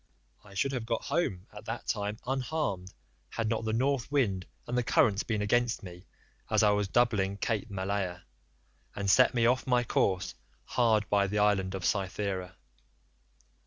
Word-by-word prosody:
I 100 -1 -15
should 135 +7 +1
have 125 -4 -3
got 115 -1 -1
home 140 - -1
at 105 0 -10
that 115 +1 -5
time 105 0 -2
unharmed 130 - -2 0.4
had 115 -1 -2
not 110 0 -1
the 110 - 0
North 135 +2 0
wind 100 -11 +1 0.2
and 120 - -3
the 125 - +3
currents 105 -3 +3
been 110 -2 -1
against 120 +2 +1
me 90 0 -10 0.4
as - - +3
I 105 - +6
was 105 -1 +1
doubling 100 -4 +2
Cape 110 +1 -1
Malea, 95 -2 -2 0.7
and 100 -1 -3
set 125 +3 +5
me 115 -1 +3
off 125 +3 +2
my 125 -1 +3
course 95 -5 0 0.3
hard 110 -4 +2
by 100 -1 +3
the 105 +2 -2
island 100 -2 +2
of 95 - -4
Cythera. 95 -2 -1
105 Hz, 165 wpm, -30 LUFS, 100-120 Hz, 0.7 s, I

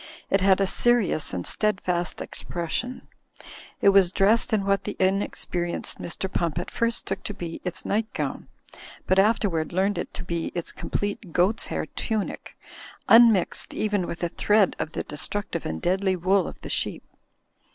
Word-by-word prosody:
It 195 - +3
had 190 0 +4
a 195 - +3
serious 225 -6 +2
and 90 -1 -4
steadfast 185 -4 0
expression. 175 +9 -4 0.8
It 200 - +8
was 195 -3 +5
dressed 210 +5 +3
in 210 -3 +1
what 195 0 +1
the 210 - -4
in 190 +1 +2
experienced 175 -3 -3
Mr. 180 +2 -3
Pump 170 -4 -2
at 175 - -4
first 230 0 -1
took - - -3
to 205 - -6
be 170 -3 -6
its 180 - -3
night 220 +2 0
gown; - - -3 0.6
but 185 - +3
afterward 195 -6 +2
learned 195 +3 0
to 180 - -6
be 170 -2 -3
its 175 - -2
complete 205 -3 -4
goats' 185 +5 +2
hair - - -2
tunic, 220 -3 -4 0.5
unmixed 225 -5 +5
even 205 -4 0
with 170 - -6
a 170 - +1
thread 205 +2 +2
of 155 - -3
tiie - - -3
destruc 200 +7 -3
tive 170 - -3
and 80 0 -5
deadly 190 +1 +1
wool 185 +1 +2
of - - -9
the - - -7
sheep. - - -1
190 Hz, 170 wpm, -25 LUFS, 175-205 Hz, 0.8 s, It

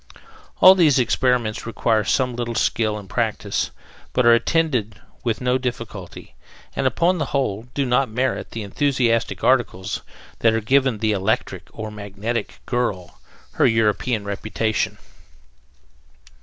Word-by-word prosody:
All 185 - +10
these 165 -7 +4
experiments 125 -3 +1
require 110 -1 +1
some 125 +3 0
little 120 -1 -3
skill 110 -1 +1
and 100 -2 -10
practice, - - -1 0.4
but 125 - +2
are 120 - +8
attended 120 - +1 0.2
with 115 -1 -1
no 125 +1 +1
difficulty, 115 -7 -6 0.4
and, 135 - +1
upon 170 +8 +1
the 150 - 0
whole, 120 -5 -2
do 140 - +1
not 125 +1 +2
merit 125 +4 -1
the 115 - -5
enthusiastic 120 0 0
articles 105 -6 +1 0.4
that 115 -1 +4
have 115 -1 -2
given 135 -1 +3
the 110 0 0
"electric" 105 +4 -1
or 110 -1 -6
"magnetic" 105 +3 -5
girl 105 -8 -2 0.3
her - - +3
European 110 0 +1
reputation. 110 +2 -2
115 Hz, 130 wpm, -22 LUFS, 110-130 Hz, 0.4 s, All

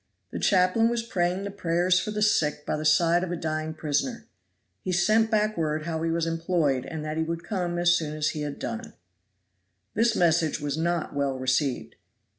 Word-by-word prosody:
The - - -4
chaplain 190 +4 +3
was 235 -1 -1
praying 185 -4 -1
the 200 - -4
prayers 180 -1 +1
for 215 - -4
the 210 0 -1
sick 150 -7 +1
by - - -1
the 155 - -4
side 170 +3 +4
of 180 - -3
a - - -1
dying 155 -1 -3
prisoner. 155 - -2 0.6
He 185 - -3
sent 215 +5 +3
back 215 -1 +1
word 155 -1 -1
how 160 -1 -3
he 165 - 0
was 165 0 0
employed, 165 -5 0
and 155 -2 -5
that 155 +1 -3
he 160 - +1
would 165 +1 -4
come 175 -2 -2
as 175 0 +4
soon 155 -2 -3
as 155 0 +1
he 150 - -4
had 145 -1 -4
done. 230 +1 -5 1.0
This 230 0 +2
message 165 -2 +2
was 145 -1 -2
not 170 +1 -1
well 140 -2 -1
received. 130 0 -1
170 Hz, 200 wpm, -26 LUFS, 155-185 Hz, 1.0 s, side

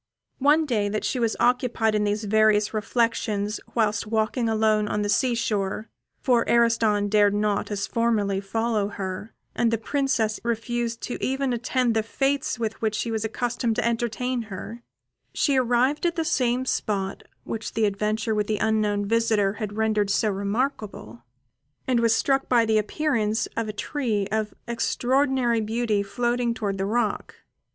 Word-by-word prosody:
One 295 +4 +4
day 215 -7 0
that 215 +1 -2
she 255 - -1
was 230 -2 +1
occupied 240 -3 +2
in 210 0 +1
these 210 +1 -1
various 215 0 +3
reflections 215 -2 0 0.2
whilst 215 -2 +1
walking 225 +2 0
alone 215 -1 +2
on 210 0 -1
the 205 - -2
sea 240 +4 +2
shore 215 -2 -2 0.3
for 245 -4 +3
Ariston 230 -3 +3
dared 205 0 +3
not, 205 -1 0
as 205 -1 -2
formerly, 210 -4 0
follow 220 +1 -1
her, 200 +1 -6 0.2
and 235 - +2
the 230 - +1
Princess 230 -3 0
refused 235 0 -2
even 265 +1 -1
to 240 - 0
attend 245 0 0
the 220 - +2
fêtes 270 +4 -1
with 220 -2 -3
which 215 -2 0
he 235 - -4
was 220 -1 -1
accustomed 235 +1 -1
to 240 -1 0
entertain 240 +2 -1
her, 215 +5 -7 0.5
she 280 - +2
arrived 255 +5 +2
at 340 - -1
the 325 -2 -1
same 250 -2 +1
spot 200 -6 -2 0.2
which 225 -1 -5
the 220 -1 +2
adventure 215 +2 -1
with 210 -1 0
the 215 - 0
unknown 210 -2 +1
visitor 220 -2 +2
had 210 0 -4
rendered 215 -2 +1
so 210 +1 +2
remarkable, 200 - -3 0.7
and 250 -2 +2
was 230 -1 +3
struck 270 +2 +1
by 235 -2 +4
the 220 -1 +3
appearance 220 -3 0
of 230 -1 -1
a - - -2
tree 215 -2 -2
of 215 -1 -1
extraordinary 245 0 +1
beauty 220 -1 0
floating 240 +3 -1
towards 200 -3 -3
the 195 - 0
rock. 220 -1 -1
225 Hz, 160 wpm, -25 LUFS, 210-240 Hz, 0.7 s, One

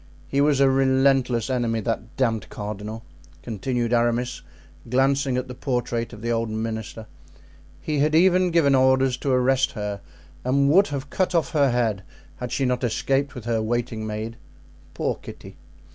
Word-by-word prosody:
He 140 - +1
was 145 -1 +3
a 140 - +5
relentless 130 -3 +2
enemy, 120 -3 0
that 115 +2 -4
damned 115 -6 0
cardinal," 105 +2 -6 0.4
continued 120 +2 -2
Aramis, 120 +1 +1 0.5
glancing 135 +1 +2
at 125 +1 -2
the 125 - -7
portrait 120 -3 -2
of 110 -2 -11
the 120 - -1
old 115 -1 0
minister. 110 0 -4 0.8
"He 150 -2 -1
had 155 +2 +2
even 180 +1 +4
given 165 -5 +3
orders 130 -1 +3
to 140 - -3
arrest 130 +1 +2
her 105 -2 -4 0.4
and 140 +2 +2
would 195 +5 +5
have 140 0 -5
cut 185 -1 0
off 165 - +1
her 140 -3 +3
head 115 -5 0 0.4
had 125 -1 -5
she 135 - 0
not 125 0 0
escaped 135 +4 0
with 120 -3 -8
her 115 -2 0
waiting 115 -1 -2
maid—poor 110 +3 -6
Kitty! - - -11
125 Hz, 160 wpm, -24 LUFS, 115-135 Hz, 0.8 s, a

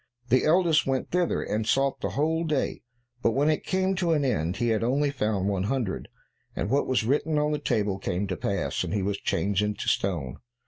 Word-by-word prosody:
The 130 +2 +3
eldest 160 -3 +3
went 135 -1 -1
thither, 180 -1 +1
and 110 +1 -2
sought 135 +2 +1
the - - -1
whole 160 +3 +1
day, 155 -4 -1 0.4
but 115 - +2
when 145 +5 +3
it 155 - -1
came 190 0 0
to 175 -3 +2
an 145 -3 +1
end, 90 -8 0
he 120 - 0
had 110 0 +1
only 140 +4 +1
found 105 -7 -1
one 100 -2 0
hundred, 120 -4 -2 0.5
and 105 - -2
what 140 +1 +2
was 130 -3 +1
written 150 +5 +1
on 150 0 +1
the 150 - -1
table 105 -5 0
came 95 +1 -2
to 95 -2 -3
pass, - - -2
and - - -3
he 100 - 0
was 100 +1 -1
changed 100 0 0
into 105 0 -2
stone. 80 -10 -1
125 Hz, 215 wpm, -27 LUFS, 100-150 Hz, 0.5 s, The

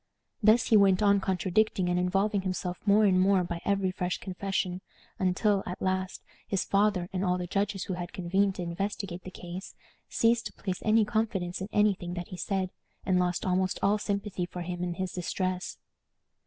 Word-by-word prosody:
Thus 220 +3 +5
he 220 - +7
went 195 -1 +4
on 200 -1 +5
contradicting 190 +1 +1
and 180 0 +1
involving 195 +3 +1
himself 185 -1 -3
more 210 +2 +6
and 185 -2 +4
more 190 -1 +4
by 170 -1 -4
every 195 -2 +1
fresh 180 -1 -2
confession, 185 -1 -3 0.4
until, 195 +2 +2
at 180 - -5
last, 185 0 -2 0.2
his 195 - 0
father, 200 -3 +2
and 185 0 -1
all 180 -1 +1
the 180 - -3
judges 200 +1 -1
who 190 - -4
had 175 0 -5
convened 195 -1 +1
to 180 - -4
investigate 185 +1 -4
the 185 - -8
case, 180 +1 -8 0.3
ceased 230 0 +2
to - - -13
place 185 -2 -4
any 220 0 +4
confidence 200 -5 -1
in 190 - -4
any 210 0 +4
thing 175 -1 -6
that 175 -1 -5
he 185 - -7
said, 190 -1 -1 0.3
and 185 -2 +3
lost 180 -1 0
almost 185 0 +1
all 205 +2 +3
sympathy 200 -3 -2
for 180 0 -6
him 175 0 -4
in 175 -1 -2
his 185 0 -3
distress. 185 +1 -2
185 Hz, 190 wpm, -29 LUFS, 180-200 Hz, 0.4 s, he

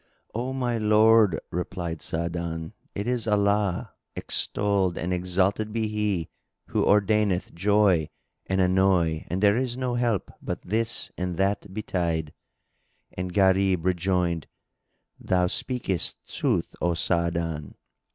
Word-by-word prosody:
"O 125 +4 -2
my 125 -3 -1
lord," 110 -2 +5
replied 85 -2 -4
Sa'adan, 85 -1 -3 0.2
"it 100 +3 -3
is 120 -2 0
Allah 100 -2 +1 0.2
(extolled 100 -3 0
and 90 +3 -2
exalted 95 +4 +1
be 110 0 -1
He!) 105 -6 -1 0.4
who - - +1
ordaineth 105 -2 +2
joy 95 -3 +3 0.4
and 95 0 0
annoy 90 -3 +2
and 90 +4 -2
there 100 0 +5
is 125 0 -1
no 130 -1 -1
help 120 -5 0
but - - -5
this 115 +4 0
and 90 -2 -2
that 100 +1 0
betide." 85 -6 -2 0.8
And 90 0 -4
Gharib 95 -2 +3
rejoined, 90 -3 0 0.7
"Thou 90 -1 +1
speakest 95 -2 -2
sooth, - - -1
O 85 -1 +1
Sa'adan!" 85 -3 -1
95 Hz, 120 wpm, -26 LUFS, 85-105 Hz, 0.8 s, lord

